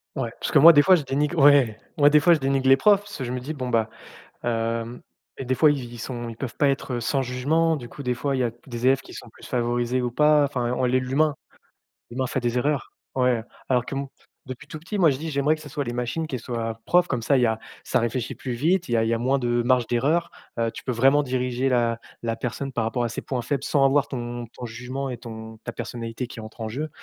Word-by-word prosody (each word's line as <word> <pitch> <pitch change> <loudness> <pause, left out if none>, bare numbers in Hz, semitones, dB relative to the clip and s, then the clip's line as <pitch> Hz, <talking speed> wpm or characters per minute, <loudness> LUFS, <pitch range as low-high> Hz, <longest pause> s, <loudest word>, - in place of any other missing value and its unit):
Ouais, 125 -5 -2
parce - - -3
que - - +5
moi, 165 +4 +10
des 145 - +7
fois, 185 +5 +6
je 160 - -1
dénigre 145 +2 -1
ouais, 135 -6 +5 0.2
moi, 145 -1 +6
des 150 +1 +6
fois 170 +4 +5
je 160 - +2
dénigre 135 0 0
les 135 - +7
profs, 200 +7 +5
parce 205 0 -11
que 135 - -4
je 125 - -4
me 125 - -2
dis: 145 +5 -5
«Bon 130 -4 -4
bah, 115 -2 +1 0.6
hem 115 0 -2 0.4
et - - -4
des 130 - +1
fois, 150 +3 +5
i 145 - -2
ils 120 -1 -8
sont 120 0 -5
ils 115 - -8
peuvent 125 -1 -5
pas 145 - +3
être 135 -3 -2
sans 135 +4 0
jugement, 145 +6 +1
du 120 -5 -8
coup, 140 - -9
des 125 0 0
fois, 135 +3 -1
il - - -2
y - - +2
a 120 - 0 0.2
des 120 0 -3
élèves 135 +1 +4
qui - - -13
sont - - -9
plus - - -14
favorisés 120 0 0
ou 125 - -1
pas», 150 +2 +4
enfin 125 -4 -1
on - - 0
l'est 125 +1 +2
l'humain. 140 +4 +1 0.8
L'humain 130 +2 -2
fait 130 - -1
des 120 0 -1
erreurs. 140 +1 -1 0.2
Ouais. 125 -3 +2 0.3
Alors 125 -2 +2
que 135 - -6
m 140 0 -2 0.4
depuis 130 +2 -9
tout 155 - -7
petit, 175 +7 -6
moi, 170 -6 +5
je 135 - -1
dis: 160 +2 -4
«J'aimerais 145 +3 +2
que 155 - -15
ce 150 - -10
soit 145 +1 -3
les 120 -3 -4
machines 125 +7 -3
qui 130 - -3
soient 115 -1 -4
profs», 180 0 +4
comme 125 - -1
ça, 135 +5 +2
il - - +3
y - - +5
a 110 -1 0 0.2
ça - - +1
réfléchit 120 +1 -2
plus 130 - -5
vite. 170 +9 +1
il - - -4
y - - +4
a 115 - +2
il 115 - 0
y 115 - +1
a - - -1
moins 130 +3 +1
de 120 -1 +1
marge 125 -1 +2
d'erreur. 155 +8 +1 0.3
Heu, 115 -1 0
tu - - -10
peux 130 - -1
vraiment 135 +5 +4
diriger 125 0 -1
la 120 -2 +1 0.2
la 115 -1 -2
personne 130 +3 -4
par 115 -3 -1
rapport 115 +2 -1
à 120 - 0
ses 115 - -5
points 125 -3 -3
faibles, 140 +1 -2
sans 140 -2 +2
avoir 140 +1 +3
ton 120 -2 -5
ton - - -7
jugement 125 +4 -5
et 125 - -4
ton 110 -1 -9
ta - - -5
personnalité 115 +1 -5
qui 120 - -10
entrent 110 +1 -10
en 110 - -3
jeu. 135 +8 -3
Heu, - - -6
125 Hz, 280 wpm, -24 LUFS, 120-140 Hz, 0.8 s, moi